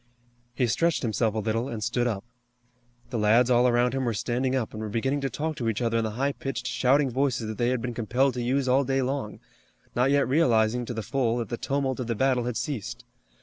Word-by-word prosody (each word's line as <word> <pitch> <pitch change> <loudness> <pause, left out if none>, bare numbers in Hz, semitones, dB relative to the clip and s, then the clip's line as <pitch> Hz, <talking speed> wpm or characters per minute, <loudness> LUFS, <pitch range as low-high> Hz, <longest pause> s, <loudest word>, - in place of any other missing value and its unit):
He 125 - +2
stretched 165 +8 +1
himself 110 -1 0
a - - -1
little 110 +3 -1
and 110 -4 -4
stood 120 +1 0
up. 105 -3 -3 0.9
The 120 - -1
lads 115 +4 +4
all 120 +1 +5
around 120 +1 +2
him 135 0 -1
were 120 -3 -1
standing 125 +4 -1
up, 125 -4 -2
and 110 - -6
were 110 - -4
beginning 135 +6 -1
to 135 - -1
talk 155 +5 -3
to 115 -2 -1
each 110 - -2
other 115 -2 +1
in - - 0
the 110 - -1
high 140 +2 +1
pitched, 135 -2 -5
shouting 135 +2 +2
voices 125 -2 0
that 110 -1 -6
they 120 0 +2
had 125 -2 -1
been 125 -1 -3
compelled 125 +4 +1
to 125 - -3
use 130 +2 0
all 130 +2 +4
day 135 0 0
long, 130 -4 -3 0.6
not 125 +2 +3
yet 140 0 +3
realizing 120 -4 +2
to 120 - -5
the 110 - -3
full 120 -1 0
that 120 - -3
the 120 - -2
tumult 135 -1 -1
of 125 - -3
the 115 - -1
battle 125 +1 +1
had 125 -2 -2
ceased. 120 -4 -4
125 Hz, 240 wpm, -26 LUFS, 115-135 Hz, 0.9 s, all